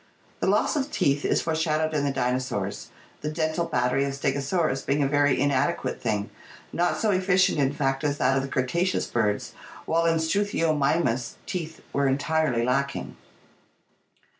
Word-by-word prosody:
The -, -, 0 dB
loss -, -, +2 dB
of 285 Hz, -1 st, -1 dB
teeth 140 Hz, -, +1 dB
is -, -, +1 dB
foreshadowed 160 Hz, -1 st, 0 dB
in 150 Hz, -2 st, 0 dB
the 140 Hz, -, +1 dB
dinosaurs, 125 Hz, -6 st, -2 dB, 0.3 s
the 150 Hz, -, -2 dB
dental 155 Hz, +2 st, -1 dB
battery 125 Hz, +2 st, +1 dB
of 140 Hz, -, -3 dB
Stegosaurus 140 Hz, +2 st, 0 dB
being 140 Hz, +1 st, +1 dB
a -, -, +2 dB
very 145 Hz, -1 st, +2 dB
inadequate 140 Hz, -2 st, 0 dB
thing, 105 Hz, -3 st, -1 dB, 0.4 s
not 175 Hz, +1 st, +1 dB
so 220 Hz, -, +1 dB
efficient 185 Hz, -2 st, +3 dB
in 135 Hz, -1 st, +2 dB
fact 135 Hz, 0 st, -1 dB
as 145 Hz, -1 st, 0 dB
that 130 Hz, 0 st, +2 dB
of 135 Hz, -, +2 dB
the 135 Hz, -, -5 dB
Cretaceous 170 Hz, +9 st, 0 dB
birds, 105 Hz, -3 st, -1 dB, 0.3 s
while 165 Hz, +1 st, +2 dB
in 165 Hz, 0 st, +3 dB
Slruthiomitnus 160 Hz, -, +1 dB
teeth 165 Hz, -4 st, -5 dB
were 140 Hz, 0 st, +2 dB
entirely 140 Hz, -3 st, +1 dB
lacking. 140 Hz, +2 st, -1 dB
145 Hz, 155 wpm, -26 LUFS, 135-160 Hz, 0.4 s, efficient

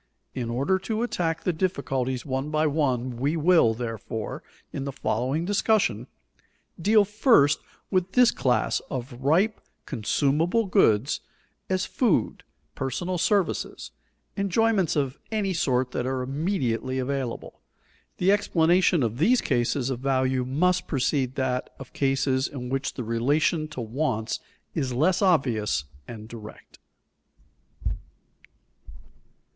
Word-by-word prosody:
In 120 Hz, -3 st, -3 dB
order 140 Hz, +11 st, +1 dB
to 220 Hz, +4 st, -2 dB
attack 165 Hz, -8 st, -1 dB
the 180 Hz, -, +1 dB
difficulties 135 Hz, -7 st, -1 dB
one 135 Hz, +1 st, -2 dB
by 155 Hz, 0 st, +1 dB
one 130 Hz, -5 st, 0 dB
we 145 Hz, +6 st, 0 dB
will, 160 Hz, -8 st, +4 dB
therefore, 115 Hz, -2 st, -5 dB, 0.3 s
in 135 Hz, -, -3 dB
the 140 Hz, -, -3 dB
following 135 Hz, +5 st, -1 dB
discussion, 190 Hz, -, +1 dB, 0.7 s
deal 210 Hz, +3 st, +5 dB
first 210 Hz, -, +4 dB, 0.3 s
with 185 Hz, -1 st, 0 dB
this 250 Hz, -1 st, +6 dB
class 125 Hz, -2 st, +1 dB
of 130 Hz, 0 st, -5 dB
ripe, 180 Hz, +11 st, +2 dB, 0.2 s
consumable 150 Hz, -, +1 dB
goods, 120 Hz, -, +3 dB, 0.5 s
as 185 Hz, 0 st, 0 dB
food, 235 Hz, -8 st, 0 dB, 0.3 s
personal 175 Hz, +8 st, -3 dB
services, 200 Hz, -1 st, 0 dB, 0.4 s
enjoyments 200 Hz, -2 st, +1 dB
of 140 Hz, -2 st, -1 dB
any 205 Hz, -3 st, 0 dB
sort 130 Hz, -6 st, +1 dB
that 125 Hz, -, -2 dB
are 130 Hz, -1 st, -1 dB
immediately 130 Hz, -, -1 dB
available. 130 Hz, -2 st, -4 dB, 0.6 s
The 185 Hz, +2 st, +3 dB
explanation 175 Hz, -4 st, +3 dB
of 115 Hz, +2 st, -2 dB
these 235 Hz, +10 st, +4 dB
cases 125 Hz, +2 st, 0 dB
of 125 Hz, -, -3 dB
value 130 Hz, -1 st, +1 dB
must 180 Hz, +8 st, +1 dB
precede 135 Hz, -2 st, 0 dB
that 130 Hz, -1 st, -1 dB
of 135 Hz, -, -11 dB
cases 135 Hz, -1 st, +1 dB
in 125 Hz, -3 st, -7 dB
which 135 Hz, +1 st, -2 dB
the 125 Hz, -, -4 dB
relation 145 Hz, +8 st, +1 dB
to 150 Hz, -5 st, -6 dB
wants 115 Hz, -1 st, -2 dB, 0.3 s
is 130 Hz, -2 st, -2 dB
less 165 Hz, -, +2 dB
obvious 125 Hz, -, +2 dB, 0.2 s
and 110 Hz, -2 st, -9 dB
direct. 110 Hz, -2 st, -12 dB
140 Hz, 120 wpm, -26 LUFS, 125-180 Hz, 0.7 s, this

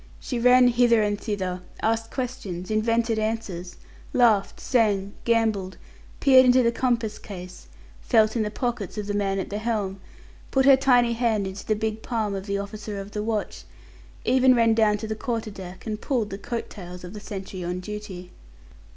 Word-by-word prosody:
She 245 Hz, -, -3 dB
ran 250 Hz, +1 st, +6 dB
hither 235 Hz, -2 st, +4 dB
and 205 Hz, 0 st, -1 dB
thither, 185 Hz, -4 st, -3 dB, 0.2 s
asked 225 Hz, 0 st, 0 dB
questions, 215 Hz, -8 st, -5 dB
invented 230 Hz, +1 st, +1 dB
answers, 215 Hz, -5 st, -3 dB, 0.4 s
laughed, 225 Hz, -5 st, +3 dB
sang, 205 Hz, -6 st, +1 dB
gambolled, 220 Hz, -5 st, +1 dB, 0.4 s
peered 260 Hz, -2 st, +7 dB
into 250 Hz, 0 st, +5 dB
the 235 Hz, -, +3 dB
compass 235 Hz, -3 st, -1 dB
case, 180 Hz, -, -10 dB, 0.3 s
felt 220 Hz, -1 st, +3 dB
in 230 Hz, -, +1 dB
the 210 Hz, -, -1 dB
pockets 230 Hz, -3 st, -3 dB
of 210 Hz, -, -3 dB
the 205 Hz, -, -3 dB
man 195 Hz, -1 st, 0 dB
at 190 Hz, -, -4 dB
the 205 Hz, -, -2 dB
helm, 210 Hz, -4 st, -2 dB, 0.5 s
put 265 Hz, -1 st, +2 dB
her 275 Hz, -1 st, +9 dB
tiny 245 Hz, -3 st, +3 dB
hand 225 Hz, -4 st, +1 dB
into 190 Hz, +1 st, -7 dB
the 215 Hz, -, +2 dB
big 220 Hz, 0 st, -3 dB
palm 220 Hz, -4 st, -2 dB
of 195 Hz, +1 st, -5 dB
the 200 Hz, 0 st, -1 dB
officer 205 Hz, +1 st, -6 dB
of 195 Hz, +1 st, -8 dB
the 210 Hz, -, -3 dB
watch, 215 Hz, -1 st, -3 dB, 0.6 s
even 255 Hz, 0 st, +5 dB
ran 230 Hz, -1 st, +4 dB
down 215 Hz, -2 st, +3 dB
to 220 Hz, -, -6 dB
the 220 Hz, -, -2 dB
quarter 225 Hz, -1 st, -3 dB
deck 185 Hz, -2 st, -10 dB
and 215 Hz, -1 st, -4 dB
pulled 235 Hz, -7 st, -1 dB
the 195 Hz, -, -5 dB
coat 235 Hz, +3 st, -5 dB
tails 180 Hz, -3 st, -9 dB
of 180 Hz, +2 st, -8 dB
the 210 Hz, -, -7 dB
sentry 195 Hz, -3 st, -7 dB
on 175 Hz, +1 st, -3 dB
duty. 190 Hz, -2 st, -7 dB
215 Hz, 185 wpm, -25 LUFS, 200-235 Hz, 0.6 s, her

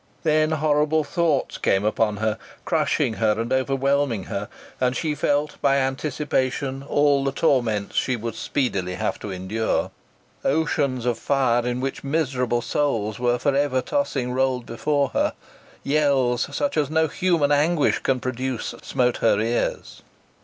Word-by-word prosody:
Then 155 Hz, -1 st, +3 dB
horrible 155 Hz, 0 st, +2 dB
thoughts 160 Hz, -2 st, 0 dB
came 95 Hz, +2 st, +1 dB
upon 105 Hz, -1 st, +1 dB
her, 110 Hz, +1 st, -1 dB, 0.3 s
crushing 115 Hz, -, +1 dB
her 110 Hz, -1 st, +2 dB
and 115 Hz, +2 st, -1 dB
overwhelming 135 Hz, -3 st, +1 dB
her, 100 Hz, +2 st, -5 dB, 0.3 s
and 125 Hz, 0 st, +1 dB
she 155 Hz, -2 st, -1 dB
felt 145 Hz, 0 st, -1 dB
by 135 Hz, -, +3 dB
anticipation 135 Hz, -1 st, -1 dB
all 145 Hz, 0 st, +2 dB
the 135 Hz, -, 0 dB
torments 120 Hz, -9 st, 0 dB
she 130 Hz, -, +1 dB
would 115 Hz, -1 st, -4 dB
speedily 100 Hz, -7 st, -2 dB
have -, -, -2 dB
to 105 Hz, -, -6 dB
endure. 95 Hz, +4 st, -1 dB, 0.5 s
Oceans 140 Hz, -4 st, 0 dB
of 120 Hz, -2 st, 0 dB
fire, 125 Hz, -4 st, +1 dB
in 125 Hz, +1 st, -2 dB
which 135 Hz, 0 st, -3 dB
miserable 130 Hz, -5 st, 0 dB
souls 115 Hz, -9 st, -1 dB
were 120 Hz, 0 st, +2 dB
for 135 Hz, +3 st, 0 dB
ever 140 Hz, -2 st, +2 dB
tossing, 135 Hz, -, -1 dB
rolled 130 Hz, -1 st, 0 dB
before 140 Hz, +4 st, 0 dB
her. -, -, 0 dB, 0.5 s
Yells, 140 Hz, -5 st, +2 dB
such 145 Hz, +1 st, -1 dB
as 145 Hz, -3 st, +1 dB
no 160 Hz, 0 st, +2 dB
human 165 Hz, -3 st, +1 dB
anguish 150 Hz, +2 st, +2 dB
can 130 Hz, -1 st, 0 dB
produce, 130 Hz, 0 st, -3 dB
smote 125 Hz, -1 st, 0 dB
her 105 Hz, -3 st, +3 dB
ears. 115 Hz, +2 st, -2 dB
130 Hz, 145 wpm, -23 LUFS, 120-145 Hz, 0.5 s, Then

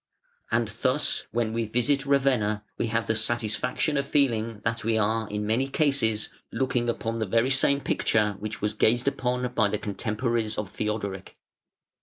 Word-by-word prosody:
And -, -, +1 dB
thus, -, -, 0 dB
when 115 Hz, -2 st, -1 dB
we 115 Hz, 0 st, 0 dB
visit 135 Hz, +5 st, +1 dB
Ravenna, 125 Hz, -7 st, +2 dB
we -, -, -1 dB
have 115 Hz, 0 st, 0 dB
the 110 Hz, -, +1 dB
satisfaction 110 Hz, +6 st, 0 dB
of 140 Hz, 0 st, -1 dB
feeling 115 Hz, -7 st, +1 dB
that 115 Hz, 0 st, -1 dB
we 110 Hz, 0 st, +1 dB
are 110 Hz, +1 st, +1 dB
(in 105 Hz, 0 st, -3 dB
many 115 Hz, +5 st, +1 dB
cases) 135 Hz, -7 st, +1 dB, 0.2 s
looking 125 Hz, -2 st, 0 dB
upon 115 Hz, 0 st, -2 dB
the 110 Hz, -, -1 dB
very 115 Hz, +6 st, +2 dB
same 140 Hz, +1 st, +3 dB
picture 105 Hz, -5 st, +1 dB
which 110 Hz, +1 st, -6 dB
was 105 Hz, 0 st, +1 dB
gazed 120 Hz, +4 st, +2 dB
upon 125 Hz, -2 st, -1 dB
by 110 Hz, -3 st, +3 dB
the 105 Hz, -, -1 dB
contemporaries 110 Hz, +1 st, -2 dB
of 105 Hz, -3 st, -4 dB
Theodoric. 105 Hz, -3 st, -4 dB
115 Hz, 165 wpm, -26 LUFS, 110-125 Hz, 0.2 s, same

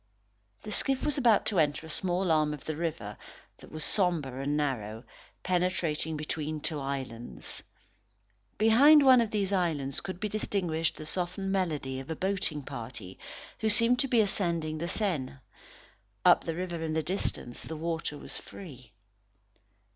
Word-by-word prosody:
The -, -, -6 dB
skiff 270 Hz, -2 st, +1 dB
was 295 Hz, -2 st, +1 dB
about 235 Hz, -5 st, +4 dB
to 200 Hz, -5 st, +1 dB
enter 150 Hz, 0 st, +1 dB
a -, -, -10 dB
small 180 Hz, +1 st, 0 dB
arm 155 Hz, -1 st, +2 dB
of 145 Hz, -, -15 dB
the 155 Hz, -, -3 dB
river, 155 Hz, -11 st, -4 dB, 0.4 s
that -, -, -14 dB
was 155 Hz, -1 st, -4 dB
sombre 160 Hz, -10 st, 0 dB
and 145 Hz, +2 st, 0 dB
narrow, 115 Hz, -6 st, -2 dB, 0.4 s
penetrating 175 Hz, -4 st, 0 dB
between 155 Hz, 0 st, -3 dB
two 150 Hz, 0 st, -3 dB
islands. 130 Hz, -4 st, -5 dB, 1.0 s
Behind 275 Hz, +8 st, +7 dB
one 255 Hz, -2 st, +8 dB
of 230 Hz, -, 0 dB
these 200 Hz, -2 st, -1 dB
islands 155 Hz, -8 st, 0 dB
could 185 Hz, -2 st, -6 dB
be 215 Hz, -, -1 dB
distinguished 180 Hz, -6 st, -1 dB
the 155 Hz, -, -8 dB
softened 185 Hz, +4 st, -2 dB
melody 150 Hz, -9 st, -1 dB
of 135 Hz, -, -9 dB
a 160 Hz, -, -2 dB
boating 180 Hz, -5 st, -2 dB
party 115 Hz, -7 st, -8 dB, 0.4 s
who 220 Hz, -, +1 dB
seemed 230 Hz, +3 st, +6 dB
to 270 Hz, -, +2 dB
be 240 Hz, -3 st, +4 dB
ascending 170 Hz, -6 st, 0 dB
the 170 Hz, -, -2 dB
Seine. 175 Hz, -9 st, 0 dB, 0.9 s
Up -, -, +6 dB
the 165 Hz, -, -2 dB
river 175 Hz, -1 st, -4 dB
in 160 Hz, -1 st, -2 dB
the 160 Hz, 0 st, 0 dB
distance, 155 Hz, -7 st, -3 dB
the 160 Hz, -, -6 dB
water 160 Hz, -2 st, -3 dB
was -, -, -4 dB
free. 130 Hz, -, -12 dB
165 Hz, 160 wpm, -29 LUFS, 145-195 Hz, 1.0 s, one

